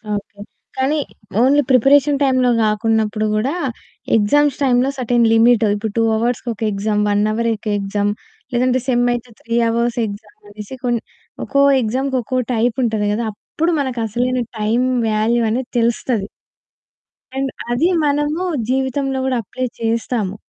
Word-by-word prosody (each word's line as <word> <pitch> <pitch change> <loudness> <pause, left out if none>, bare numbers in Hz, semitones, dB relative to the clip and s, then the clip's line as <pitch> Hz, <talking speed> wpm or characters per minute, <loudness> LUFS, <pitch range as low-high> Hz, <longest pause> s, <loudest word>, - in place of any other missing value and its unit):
Okay. 205 +1 -7 0.4
కానీ 285 +4 +1 0.4
only 285 +3 +4
preparation 275 +3 +4
టైమ్‌లో 255 -2 +3
గాకున్నప్పుడు 215 0 +1
గూడా 240 +8 0 0.6
ఎగ్జామ్స్ 285 +6 +2
టైమ్‌లో 255 0 +3
సెర్టైన్ 240 -1 +2
లిమిట్ 230 0 +5
ఇప్పుడు 215 0 -3
2 225 - +3
అవర్స్‌కి 240 +1 -1
ఒక 215 - -18
ఎక్సామ్, 210 +1 -1
1 205 0 +2
హవర్ 230 +2 0
ఒక 215 - -10
ఎక్సామ్, 205 +1 -1 0.4
లేదంటే 255 +1 +2
సెమ్ 245 -1 +2
అయితే 240 0 -5
3 230 0 -2
హవర్స్ 235 +1 0
ఎక్సామ్ 205 0 -9
అనేసి 210 +5 -9
కొన్ 240 -2 +1 0.5
ఒక్కో 280 0 +2 0.2
ఎక్సామ్‌కి 260 +4 -1
ఒక్కో 255 +3 -2
టైప్ 235 +2 0
ఉంటది 215 -2 0
గదా! 230 +2 -2
అప్పుడు 330 +10 -2
మనకు 255 -3 -3
అసలైన 250 +4 -1 0.2
టైమ్ 230 +4 +1 0.2
వాల్యూ 220 +3 +1
అనేది 245 +3 -2
తెలుస్తది. 230 -2 0 1.1
అండ్ 270 0 0 0.2
అది 305 +9 +2
మనము 295 +4 0 0.3
జీవితంలో 265 +1 0
గూడా 260 -2 0
అప్లై 255 +6 -4 0.2
చేస్తాము. 225 -3 -1
240 Hz, 140 wpm, -18 LUFS, 215-260 Hz, 1.1 s, లిమిట్